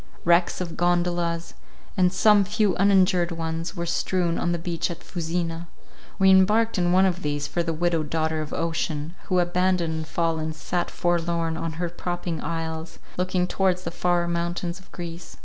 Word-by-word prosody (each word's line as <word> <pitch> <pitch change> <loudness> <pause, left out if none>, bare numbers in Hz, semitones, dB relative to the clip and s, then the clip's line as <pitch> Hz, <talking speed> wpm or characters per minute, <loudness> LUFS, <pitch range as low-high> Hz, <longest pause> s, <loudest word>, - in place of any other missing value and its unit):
Wrecks 170 +1 +3
of 175 -3 -4
gondolas, 175 -1 0 0.4
and 180 -1 +3
some 205 +2 +5
few 210 0 +1
uninjured 185 -2 +4
ones, 165 +1 -3
were 170 -1 -3
strewed 170 0 0
on 175 - 0
the 170 - 0
beach 170 +1 -2
at 170 0 -7
Fusina. 170 -1 -3 0.5
We 190 0 +5
embarked 210 +3 +4
in 175 0 +2
one 190 +2 +5
of 180 -1 0
these 145 -2 -2
for 170 - -1
the 165 -1 -1
widowed 165 -2 0
daughter 160 0 0
of 155 - -6
ocean, 160 -1 -2
who, 185 - 0
abandoned 180 -1 +1
and 160 0 -4
fallen, 160 -2 -1
sat 175 +3 -2
forlorn 170 -1 0
on 160 0 -3
her 175 +2 -2
propping 175 -1 -4
isles, 165 0 -4 0.2
looking 180 0 0
towards 185 0 0
the 170 - -4
far 175 0 +1
mountains 170 +1 -2
of 185 - -21
Greece. 170 -1 -8
175 Hz, 170 wpm, -25 LUFS, 165-180 Hz, 0.5 s, some